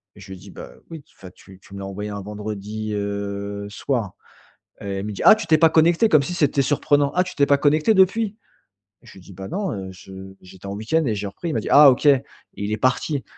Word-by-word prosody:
Je 95 -1 -13
lui 95 - -9
dis: 100 - -14
«Bah, - - -11 0.2
oui, 160 -4 -9
enfin, 95 - -12
tu 95 0 -17
tu 100 - -18
me 100 - -7
l'as 95 - -6
envoyé 105 +2 -6
un 100 -1 -6
vendredi, 105 +1 -6
heu, 100 0 -4
soir» 110 -2 -3 0.7
et 100 -1 -4
il 100 - -5
me 105 - -4
dit: - - -7
«Ah, - - +9
tu 220 - -6
t'es 155 - +4
pas 165 0 +5
connecté?» 170 +7 +3
Comme 150 -6 +4
si 180 - -5
c'était 145 -4 +1
surprenant! 145 0 +1
«Ah, 180 - +3
tu - - -9
t'es 140 - +3
pas 140 - +4
connecté 155 +8 +2
depuis?» 210 +3 +2 0.7
Je - - -16
lui 95 - -14
dis: 95 - -15
«Bah, 95 +1 -8
non, 195 0 -3
heu, 95 -2 -6
je 95 +1 -15 0.3
j'étais 95 +1 -14
en 100 - -5
week-end 115 +10 -1
et 110 - 0
j'ai 100 0 -4
repris». 170 - -7
Il - - -3
m'a - - 0
dit: - - -6
«Ah, 145 -1 +8
OK!» 130 +3 -1
et 140 -2 +5 0.3
il 100 +1 -5
est - - 0
parti. 130 +3 -1
110 Hz, 250 wpm, -21 LUFS, 100-150 Hz, 0.7 s, Ah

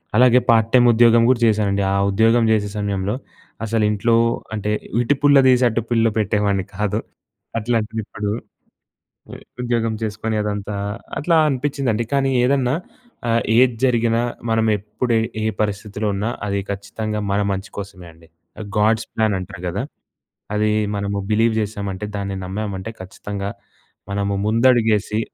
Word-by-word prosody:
అలాగే 125 +1 +6
part 115 -1 +3
time 120 -1 +6
ఉద్యోగం 115 0 +5
కూడా 130 -2 +3
చేశానండి. 100 -2 +1
ఆ 100 - +2
ఉద్యోగం 115 +3 +3
చేసే 105 -2 +1
సమయంలో 100 0 -1 0.5
అసలు 110 0 0
ఇంట్లో 115 +3 +2 0.4
అంటే, 105 0 -2 0.3
ఇటు 120 +4 +2
పుల్ల 145 -1 +6
తీసి 125 0 +4
అటు 115 +1 -1
పుల్ల 115 -1 +3
పెట్టేవాడిని 100 -2 0
కాదు. 105 +2 -1 0.6
అట్లాంటిది 110 -1 -1
ఇప్పుడు, 105 0 -4 1.3
ఉద్యోగం 115 -2 0
చేసుకొని 110 0 -2
అదంతా 105 0 -3 0.4
అట్లా 165 +2 +2
అనిపిచిందండి. 130 -4 -1
కానీ 135 -1 +2
ఏదన్నా 130 0 +2 0.5
ఆహ్, 115 0 +3 0.2
ఏది 125 -2 +4
జరిగినా 115 -2 +2 0.3
మనం 115 0 +2
ఎప్పుడు 110 +4 -2 0.3
ఏ - - -1 0.2
పరిస్థితిలో 105 0 -2
ఉన్నా, 100 +3 -1 0.2
అది 100 -1 -1
ఖచ్చితంగా 105 +2 -4
మన 100 +1 +1
మంచి 95 0 -5
కోసమే 95 -3 -8
అండి. 80 0 -20 0.5
గాడ్స్ 110 +1 +2
ప్లాన్ 110 -2 +1
అంటరు 95 -1 -8
కదా! 95 +6 -2 0.7
అది 105 0 +2 0.3
మనము 100 0 -2
బిలీవ్ 110 +1 +3
చేసామంటే, 100 -1 -4
దాన్ని 100 -1 -3
నమ్మామంటే, 100 +2 -4
ఖచ్చితంగా 100 +1 -6 0.6
మనము 100 0 -1
ముందడుగేసి 110 -2 +3
110 Hz, 135 wpm, -20 LUFS, 100-115 Hz, 1.3 s, అలాగే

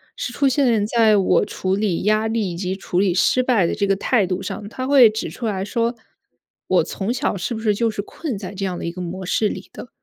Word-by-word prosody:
是 - - -4
出 275 +3 +1
现 245 -6 +2
在 220 -2 +4
我 195 - +3
处 190 0 -2
理 200 -4 -1
压 215 +2 +2
力 220 -4 -1
以 - - -6
及 185 +2 -3
处 180 -1 -1
理 195 -3 +2
失 220 +8 +3
败 230 -9 +2
的 - - -2
这 200 - 0
个 195 -1 +1
态 215 0 +2
度 180 0 -3
上。 205 - -6
他 255 +3 -5
会 265 -5 +7
指 220 +1 -4
出 240 - -7
来 195 -3 -2
说， 235 +3 -1 0.7
我 - - +3
从 205 +4 -3
小 255 -3 -1
是 195 +6 -3
不 220 - -4
是 215 -2 +1
就 230 +1 +1
是 205 - -4
困 260 +3 -5
在 195 -1 -7
这 195 0 -5
样 185 -2 -2
的 - - -5
一 170 - -2
个 180 - -7
模 180 +2 -5
式 210 +3 +1
里 - - -7
的？ - - -9
210 Hz, 275 characters per minute, -21 LUFS, 190-235 Hz, 0.7 s, 会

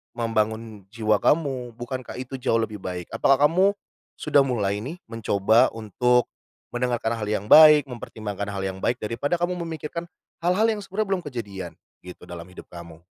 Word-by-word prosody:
membangun 110 -2 -2
jiwa 110 -2 +1
kamu, 135 -6 +1
bukankah 130 0 -6
itu 130 +1 -6
jauh 115 -2 +1
lebih 110 -2 -3
baik? 90 -2 -5
Apakah 140 +2 +4
kamu 185 +5 +3 0.5
sudah 140 - +4
mulai 105 -5 -1
nih 160 +8 -7
mencoba 110 -1 +2
untuk 125 +3 +1 0.5
mendengarkan 120 -2 0
hal 105 - -3
yang 105 -1 -2
baik, 150 0 +8
mempertimbangkan 105 -4 -6
hal 100 - -4
yang 95 0 -3
baik 125 - +1
daripada 130 +10 -2
kamu 175 +1 0
memikirkan 165 0 -5 0.4
hal-hal 190 +6 +3
yang 210 -2 -2
sebenarnya 195 +2 -2
belum 180 - -6
kejadian 105 -9 -6 0.3
gitu, 90 0 -11
dalam 85 -1 -7
hidup - - -12
kamu? 85 -2 -11
115 Hz, 160 wpm, -24 LUFS, 105-145 Hz, 0.5 s, baik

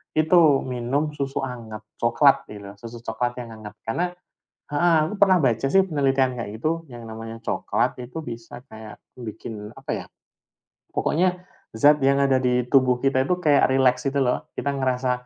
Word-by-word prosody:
itu 155 -2 +4
minum 130 +4 -2
susu 140 -2 -3
hangat 110 -4 -7 0.2
coklat, 135 +4 +3
gitu. 100 -1 -9
Susu 115 +1 -10
coklat 120 +2 -2
yang 120 -2 -7
hangat. 110 -2 -10
Karena 175 +11 -1 0.6
heeh. 165 +3 +3
Aku 210 - -5
pernah 190 -3 +4
baca 120 -4 +1
sih 195 - +5
penelitian 135 -7 +1
kayak 110 -2 -6
gitu, 165 +4 -1
yang 120 -1 -9
namanya 115 +1 -8
coklat 115 - -1
itu 130 +7 -7
bisa 115 -5 -8
kayak 110 -1 -11 0.2
bikin 110 -2 -8
apa - - -6
ya, - - -6 0.8
pokoknya 180 +2 0 0.3
zat 145 +4 +5
yang 140 +1 +3
ada 135 -2 +3
di 125 -1 +1
tubuh 130 -1 +3
kita 130 +1 +1
itu 180 - +2
kayak 150 -7 +3
rileks 130 0 +2
gitu 140 -1 0
loh. 125 - -1
Kita 140 0 -1
ngerasa 130 -1 0
130 Hz, 165 wpm, -24 LUFS, 115-145 Hz, 0.8 s, sih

